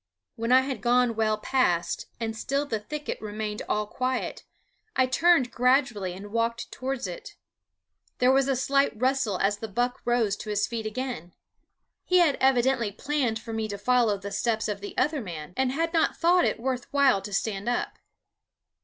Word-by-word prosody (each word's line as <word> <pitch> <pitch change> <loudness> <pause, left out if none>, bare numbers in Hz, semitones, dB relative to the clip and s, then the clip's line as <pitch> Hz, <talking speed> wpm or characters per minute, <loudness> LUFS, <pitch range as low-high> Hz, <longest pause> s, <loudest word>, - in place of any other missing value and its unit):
When 230 +1 -2
I 260 +1 +7
had 265 0 -4
gone 245 -1 +3
well 215 -1 +1
past 180 -8 0
and 225 -1 -3
still 275 +5 -1
the 225 -6 -2
thicket 300 +8 -5
remained 215 0 -4
all 210 0 +1
quiet, 255 +4 -3 0.5
I 260 - +4
turned 270 -1 +3
gradually 250 -7 +2
and 200 +3 -9
walked 230 +1 -1
towards 260 -2 -3
it. 185 - -7 0.8
There 250 +1 +4
was 270 0 +3
a 270 - +2
slight 275 -2 +1
rustle 255 -6 +1
as 205 +2 +1
the 225 - -5
buck 245 +4 -1
rose 235 -4 +1
to 215 - -8
his 210 0 +1
feet 225 -2 -4
again. 215 -7 -5 0.7
He 365 - +2
had 335 -5 +4
evidently 255 -3 +3
planned 265 -1 -1
for 225 0 -8
me 220 -1 -2
to 205 -1 -5
follow 230 -1 +2
the 200 +1 -7
steps 220 0 0
of 205 -2 -4
the 205 - -8
other 295 +2 +1
man, 165 -5 -7
and 260 0 +1
had 330 +4 -1
not 325 -1 +2
thought 350 +1 +4
it - - 0
worth 250 0 -3
while 275 -8 +4
to 205 - -8
stand 200 +2 -1
up. 245 - -2
240 Hz, 180 wpm, -27 LUFS, 210-265 Hz, 0.8 s, I